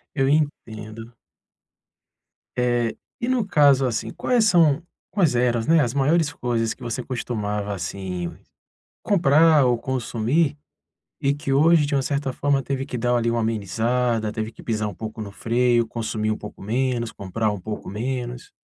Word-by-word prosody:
Eu 135 -1 +2
entendo. 115 -6 -2 1.4
Eh, 120 -2 +1 0.2
e 240 - -2
no 250 -5 +1
caso 140 -7 +4
assim 115 -1 -2
quais 240 -3 +1
são 165 -5 +4 0.3
quais 175 -10 +2
eram, 120 -1 +2
né, 165 0 +5
as 120 -1 0
maiores 150 +2 +2
coisas 115 -2 -1
que - - -25
você 120 +1 -3
costumava, 105 -5 -3
assim, 90 -1 -4 0.7
comprar 160 -5 +5
ou 120 -2 +2
consumir, 130 +5 0 0.7
e 140 0 +2
que 145 -1 -4
hoje 155 +1 +5
de 145 - -1
uma 135 - +2
certa 140 0 -1
forma 140 0 +1
teve 135 +1 -3
que 125 - -5
dar 120 +1 +1
ali 115 -1 +1
uma 120 - 0
amenizada, 110 +2 0
teve 110 +1 -4
que - - -14
pisar 110 -2 -1
um - - -8
pouco 110 +3 -7
no 100 -2 -6
freio, 120 +1 +1
consumir 110 -2 -2
um 110 - -2
pouco 105 - -10
menos, 120 +1 -1
comprar 105 +3 -2
um 105 - -4
pouco 105 +1 -6
menos. 120 +3 -4
120 Hz, 160 wpm, -23 LUFS, 110-140 Hz, 1.4 s, né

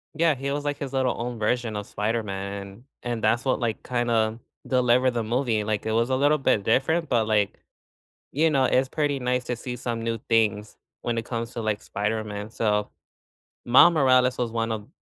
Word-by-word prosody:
Yeah, 160 -2 +3
he 140 +2 -3
was 145 +1 -2
like 145 0 -1
his 140 -1 -6
little 130 -2 +1
own 120 0 -4
version 115 0 0
of 105 -1 -4
Spider-Man 105 -2 -3
and 100 +4 -13 0.2
and 120 -2 -3
that's 120 +4 +2
what, 130 - +1
like, 115 -3 -2
kinda 115 -2 0 0.3
delivered 125 0 +3
the 120 -2 -2
movie, 115 -1 0
like, 105 0 -2
it 110 - -1
was 115 +3 +1
a 130 - +2
little 145 +3 +3
bit 110 -7 +1
different, 155 +9 +1
but, 115 -3 +2
like, 105 -3 +1 0.8
you 160 +4 +3
know, 135 -3 +2
it's 130 +1 +2
pretty 145 -1 -1
nice 125 0 0
to 125 - -3
see 125 +1 -6
some 120 -1 -4
new 115 0 -2
things 110 -2 +1 0.3
when 120 -1 -1
it 115 - -3
comes 115 -1 -4
to, 115 - -5
like, 110 -1 -1
Spider-Man, 105 0 -3
so 105 -2 0 0.8
Miles 130 +8 +7
Morales 130 -4 +3
was 120 -2 -1
one 115 0 -1
of 105 -1 -4
120 Hz, 200 wpm, -25 LUFS, 110-130 Hz, 0.8 s, Miles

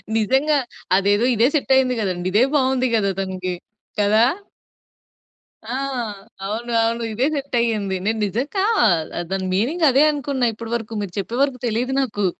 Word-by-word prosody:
నిజంగా 265 +7 +2 0.4
అదేదో 205 +3 +2
ఇదే 230 +3 +4
సెట్ 285 - 0
అయింది 255 -1 +3
గదండి. 180 -2 -2
ఇదే 215 +5 +4
బావుంది 260 -2 +2
గదా 200 -3 +1
తనికి. 185 -1 -3 0.4
కదా? 210 +2 +4 1.4
ఆ! 240 - -4 0.7
అవును, 230 +4 -4
అవును. 230 +1 0
ఇదే 250 +6 +1
సెట్ 280 -2 -4
అయింది. 210 -5 0
నేను 220 +1 0
నిజంగా 265 - -2 0.2
ఆహ్, 170 -7 +2 0.3
దాని 190 -1 -1
మీనింగ్ 295 - +1
అదే 275 +4 +5
అనుకున్న 270 -4 -1
ఇప్పడి 225 +1 -8
వరకు, 225 -1 -5
మీరు 185 - -7
చెప్పే 230 +5 -4
వరకు 270 -3 -1
తెలీదు 240 +4 -1
నాకు. 205 -6 -1
230 Hz, 150 wpm, -21 LUFS, 205-260 Hz, 1.4 s, అదే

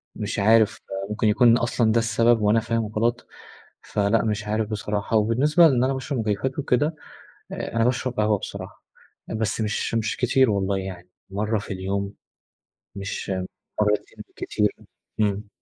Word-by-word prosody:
مش 105 -1 -3
عارف. 110 +1 +4 0.3
ممكن 105 +1 0
يكون 115 +2 +5
أصلًا 115 -1 +1
ده 115 - +3
السبب 115 0 +3
وأنا 105 +2 +4
فاهم 115 -1 -1
غلط، 115 +3 -1 0.6
فلأ 105 +2 +1
مش 105 -1 -2
عارف 110 0 -1
بصراحة. 105 +1 -2
وبالنسبة 135 +10 +4
لأن 130 -3 +2
أنا 135 - +1
باشرب 135 0 -3
مكيفات 110 +5 -1
وكده، 145 +2 +1 0.6
أنا 115 0 -1
باشرب 125 +1 0
قهوة 105 -1 +2
بصراحة، - - -8 0.4
بس 110 -1 -1
مش 110 +1 -1
مش 115 -1 0
كتير 130 0 +3
والله، 100 -1 0
يعني 95 -2 -7 0.2
مرة 105 +3 -1
في 100 - -6
اليوم. 100 +1 -3 0.8
مش 100 +1 -5 0.5
مرتين 105 0 -1
بالكتير، 105 -1 -1 0.4
إمم. 105 0 0
110 Hz, 140 wpm, -24 LUFS, 105-120 Hz, 0.8 s, يكون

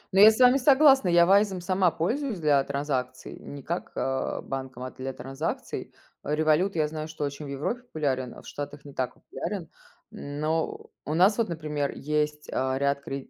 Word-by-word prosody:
Ну, - - +5
я 210 +2 +11
с 220 - 0
вами 250 +1 +7
согласна, 275 -3 +6
я 170 0 +6
"Вайзом" 195 0 +3
сама 185 +1 +2
пользуюсь 215 - -2
для 145 -3 +3
транзакций, 135 -3 -3
не 140 -1 -9
как, 170 +5 -4
э, 135 0 -2
банком, 130 -2 -6
а 130 - -5
для 130 +1 -5
транзакций, 135 +5 -5 0.3
э, 150 - -1
Revolute, 155 +5 +2
я 155 -1 +2
знаю, 155 0 -5
что 155 -1 -6
очень 145 +1 -4
в - - -7
Европе 150 - -3
популярен, 135 - -2
а - - -12
в - - -14
Штатах 145 0 -7
не 140 - -10
так 130 -2 -2
популярен. - - -6 0.4
Но 155 +3 -3
у 150 - -2
нас 190 +5 +5
вот, 225 -4 +1
например, 150 -3 -2
есть, 150 0 -2
э, 130 0 0
ряд 140 0 0
кред 135 -1 -6
150 Hz, 190 wpm, -27 LUFS, 140-180 Hz, 0.4 s, я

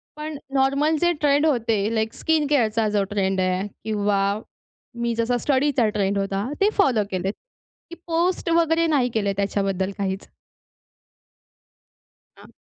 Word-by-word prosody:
पण 300 -1 -6 0.2
नॉर्मल 275 +3 +2
जे 345 0 +4
ट्रेंड 290 +1 +3
होते, 230 -7 +1
लाइक 220 0 -1
स्किन 315 -3 0
केअर 280 -6 +3
चा 220 0 0
जो 205 -1 +1
ट्रेंड 195 -2 0
आहे, 185 +2 0 0.2
किंवा 205 -2 0 0.8
मी 235 0 0
जसा 235 +2 0
स्टडीचा 270 -2 +1
ट्रेंड 200 -1 0
होता, 195 0 -1 0.2
ते 405 - +5
फॉलो 255 - +3
केलेत. 190 +2 -2 0.6
की 340 - -8
पोस्ट 340 +1 0
वगैरे 330 0 +3
नाही 270 -5 +2
केले 200 -3 0
त्याच्याबद्दल 195 -1 -1
काहीच. 195 0 -3 2.1
हां. - - -16
230 Hz, 140 wpm, -23 LUFS, 200-295 Hz, 2.1 s, ते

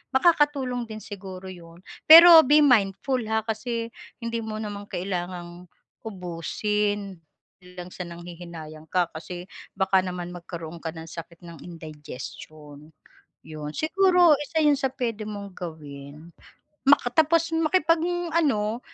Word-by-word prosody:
Makakatulong 270 -5 +2
din 215 0 -7
siguro 190 -2 -9
'yon, 170 -1 -14 0.3
pero 335 +1 +11
be 295 +3 +5
mindful, 245 0 +2
ha, 220 0 +1
kasi 230 +1 -3 0.3
hindi 230 0 -2
mo 215 -1 -5
naman 205 -1 -6
kailangang 175 -1 -5 0.4
ubusin, 200 +1 -3 0.4
hindi 180 - -18
lang 180 0 -7
sa 180 - -6
nanghihinayang 170 -2 -10
ka, 180 -2 +1
kasi 175 +2 -8 0.3
baka 190 -1 +3
naman 180 -1 -5
magkaroon 170 -1 -8
ka 165 - -4
ng 160 0 -9
sakit 165 +1 -10
ng 170 -1 -11
indigestion. 150 -2 -10 0.5
'Yun, 155 -1 -7
siguro, 355 -2 +4
isa 315 +2 -1
'yun 295 -1 +4
sa 270 - +1
puwede 230 -5 -3
mong 200 -2 -7
gawin. 150 -1 -9 0.6
Maka 275 -3 +5
tapos, 330 +3 +2
makipag-ano, 325 - +1
200 Hz, 125 wpm, -25 LUFS, 170-265 Hz, 0.6 s, pero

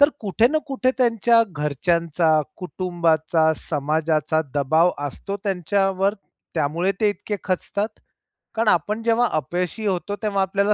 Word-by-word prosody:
तर 285 - +8
कुठे 215 +2 +2
ना 310 +3 +1
कुठे 265 -2 +1
त्यांच्या 235 -1 +4
घरच्यांचा, 160 +1 +1 0.2
कुटुंबाचा, 165 -2 +1 0.2
समाजाचा 155 +1 0
दबाव 155 +5 +3 0.2
असतो 195 +8 -5
त्यांच्यावर, 195 +1 +1 0.4
त्यामुळे 165 +5 0
ते 215 - +4
इतके 205 0 -3
खचतात? 200 +2 -1 0.7
कारण 225 0 0
आपण 210 +5 +1
जेव्हा 235 +1 +3
अपयशी 175 - -2
होतो. 200 +1 -1
तेव्हा 200 -2 +1
आपल्याला 200 +2 +2
185 Hz, 125 wpm, -22 LUFS, 160-210 Hz, 0.7 s, तर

